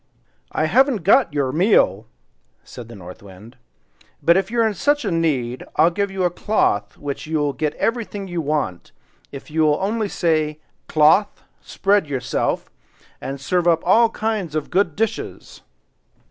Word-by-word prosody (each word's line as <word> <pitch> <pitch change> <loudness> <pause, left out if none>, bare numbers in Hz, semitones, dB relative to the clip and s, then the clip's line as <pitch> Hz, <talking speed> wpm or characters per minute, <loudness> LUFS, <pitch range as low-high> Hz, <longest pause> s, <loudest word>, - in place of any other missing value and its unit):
"I 155 - 0
haven't 245 - +2
got 220 0 +4
your 140 -3 -1
meal," 185 +9 +2 0.6
said 120 - -11
the 115 - -11
North 90 -2 -11
Wind; 100 +5 -14 0.7
"but 170 +1 +5
if 190 +1 0
you 235 +1 -2
are 225 - +3
in 215 - -2
such 290 +5 0
need, 150 - -1
I'll 165 +2 +4
give 200 +3 -1
you 195 -1 -3
a 175 - +2
cloth 105 - 0
which 145 +1 -6
will 150 -3 0
get 150 +3 -2
you - - -20
everything 225 -4 -2
you 175 -2 -3
want, 145 - -3 0.4
if 140 +2 -10
you 155 0 +2
only 210 +4 -2
say, 155 -4 0 0.3
'Cloth, 155 +7 +3 0.2
spread 200 -4 +1
yourself, 130 -4 -2 0.5
and 135 +1 -5
serve 175 +5 0
up 165 -1 +3
all 225 +6 +5
kinds 215 -8 -3
of 155 - -3
good 180 -4 +1
dishes! 225 +1 -4
165 Hz, 160 wpm, -21 LUFS, 145-205 Hz, 0.7 s, but